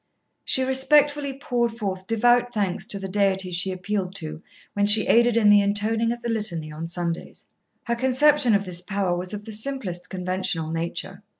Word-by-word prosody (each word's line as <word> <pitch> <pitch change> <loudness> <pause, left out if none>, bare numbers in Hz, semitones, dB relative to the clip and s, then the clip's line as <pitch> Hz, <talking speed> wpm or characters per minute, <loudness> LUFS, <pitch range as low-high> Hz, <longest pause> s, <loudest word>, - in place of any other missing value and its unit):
She 260 - +2
respectfully 280 +2 +3
poured 240 -4 -1
forth 190 -4 -4
devout 240 +2 +2
thanks 200 -3 -2
to 205 - -3
the 195 0 -5
Deity 190 -1 0
she 180 +2 -1
appealed 185 0 -3
to 155 -2 -5 0.3
when 205 0 +1
she 215 +1 +6
aided 235 0 +3
in 220 -2 +4
the 205 0 +6
intoning 215 +3 0
of 240 0 -6
the 235 - -3
Litany 185 -9 -1
on 160 +2 -6
Sundays. 170 -1 -5 0.4
Her 235 - -1
conception 260 -1 +3
of 200 0 0
this 180 -1 -4
Power 190 -1 -1
was 180 +1 -5
of 210 0 -7
the 225 - -8
simplest 210 -7 -4
conventional 180 -3 -3
nature. 165 +1 -5
205 Hz, 180 wpm, -24 LUFS, 180-235 Hz, 0.4 s, she